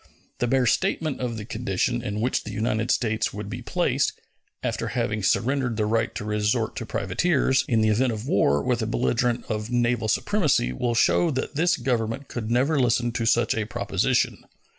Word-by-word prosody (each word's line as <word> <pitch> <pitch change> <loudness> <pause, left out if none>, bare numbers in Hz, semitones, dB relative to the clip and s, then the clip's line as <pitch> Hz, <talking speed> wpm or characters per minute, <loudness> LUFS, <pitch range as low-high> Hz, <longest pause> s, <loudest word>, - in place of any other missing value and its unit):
The 120 - +1
bare 130 +1 +2
statement 155 - 0
of 120 -3 -3
the 105 - -6
condition 120 +1 -1
in 105 -2 -3
which 125 +3 0
the - - -7
United 110 +2 -1
States 110 -1 +1
would 105 0 -6
be 120 +3 -5
placed, 140 -2 0 0.5
after - - -2
having 105 0 -1
surrendered 125 +4 +1
the 105 - +1
right 115 +1 0
to - - -4
resort 105 0 0
to - - -5
privateers, 135 -6 +1
in 115 -3 +2
the 110 - +3
event 120 +4 +2
of 110 +3 -5
war 75 - +2
with - - 0
a - - -1
belligerent 65 - 0
of 105 0 -3
naval 120 -2 +1
supremacy 140 - +1
will 120 - -1
show 170 +8 +3
that 130 -2 -3
this 170 +3 +2
Government 120 +1 -2
could 110 -3 -4
never 135 +6 +2
listen 120 -1 +2
to 115 -1 -2
such 115 0 +3
a 110 -1 -2
proposition. 110 - 0
120 Hz, 185 wpm, -25 LUFS, 110-130 Hz, 0.5 s, the